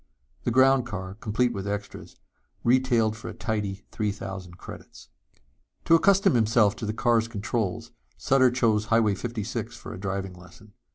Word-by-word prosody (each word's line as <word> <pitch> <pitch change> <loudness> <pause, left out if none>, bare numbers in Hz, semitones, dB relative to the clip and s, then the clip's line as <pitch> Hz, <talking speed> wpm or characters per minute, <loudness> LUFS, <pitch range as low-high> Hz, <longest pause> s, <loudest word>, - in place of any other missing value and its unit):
The - - +2
ground 130 +1 +4
car, 95 -4 -5
complete 115 +4 0
with 100 0 -5
extras, 105 0 -6 0.5
retailed 120 -3 +2
for 110 - -8
a 110 - -8
tidy 105 -4 -3
three 105 -1 -1
thousand 95 -3 -8
credits. - - -12 0.8
To - - +4
accustom 195 +2 +5
himself 110 -2 +3
to 110 - -5
the - - 0
car's 115 0 +2
controls 110 -3 -3 0.3
Sutter 130 -1 +4
chose 115 -4 +1
Highway 110 -2 +3
56 115 +2 -4
for - - -9
a - - -8
driving 95 -1 -3
lesson. 90 +4 -16
110 Hz, 155 wpm, -26 LUFS, 100-120 Hz, 0.8 s, accustom